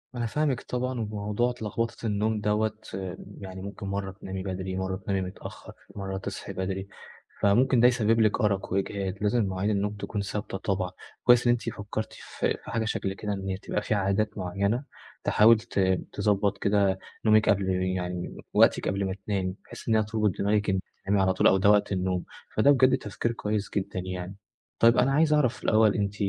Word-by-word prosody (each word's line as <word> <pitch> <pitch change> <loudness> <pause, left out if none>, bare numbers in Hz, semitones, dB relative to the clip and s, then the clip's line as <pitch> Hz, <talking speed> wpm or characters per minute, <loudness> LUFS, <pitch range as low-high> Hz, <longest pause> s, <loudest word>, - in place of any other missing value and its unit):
أنا 120 -1 -1
فاهمِك 135 +1 0
طبعًا، 125 0 -3
وموضوع 105 +2 -1
ت 125 - -11
لغبطة 115 +2 -3
النوم 105 0 0
دوّة 105 +1 +1 0.7
يعني 95 -1 -8
ممكن 100 0 -7
مرّة 100 0 -3
تنامي 95 -1 -6
بدري، 95 -1 -4
مرّة 95 0 -2
تنامي 95 0 -2
متأخر، 90 +1 -8 0.2
مرّة 95 -1 -4
تصحي 100 0 -6
بدري، 95 +1 -3 0.5
فممكن 120 +5 +4
ده 120 - +7
يسبب 115 -2 +2
لِك 110 +3 +2
أرق 100 -3 0
وإجهاد، 95 -1 -1
لازم 105 +1 +2
مواعيد 95 +2 -1
النوم 105 0 0
تكون 100 0 -4
ثابتة 100 0 -4
طبعًا، 95 -1 -2 0.3
كويس 120 0 +5
إن - - +6
أنتِ 120 -1 0
فكّرتِ 110 0 -5
في - - -3
في - - -8
حاجة 115 -1 0
شكل 95 -3 -2
كده، 105 +1 -3
إن 95 -1 -4
هي 95 - -1
تبقي 105 +1 -3
في - - -1
عادات 100 +2 0
معيّنة 100 +6 -1 0.4
تحاول 110 +2 +6
ت 105 - -4 0.3
تضبّط 100 -1 +1
كده 100 -2 +2 0.3
نومِك 110 0 +5
قبل 100 -1 +2
يعني 90 -1 -2 0.2
وقتِك - - +4
قبل 100 +1 0
ما 95 -1 -2
تنامي، 95 -3 -1
بحيث - - -11
إن 110 - +4
هي 110 - +4
تُربط 105 -1 0
دماغِك 105 +1 +1
إن 95 -1 +2 0.3
تنامي 100 0 +2
على 95 0 +3
طول 95 - +4
أو 95 - +5
ده 100 +2 +4
وقت 105 -1 +4
النوم، 90 -1 0 0.3
فده 125 +7 +6
بجد 130 -1 +5
تفكير 115 0 -3
كويس 105 -2 -2
جدًا 100 -1 -2
يعني. 90 +1 -5 0.4
طيب 115 +1 +6
أنا 135 - +4
عايز 155 +2 +4
أعرف 145 -6 +1
الأول 110 -1 +4
أنتِ، 100 -1 -1
100 Hz, 185 wpm, -27 LUFS, 95-110 Hz, 0.7 s, ده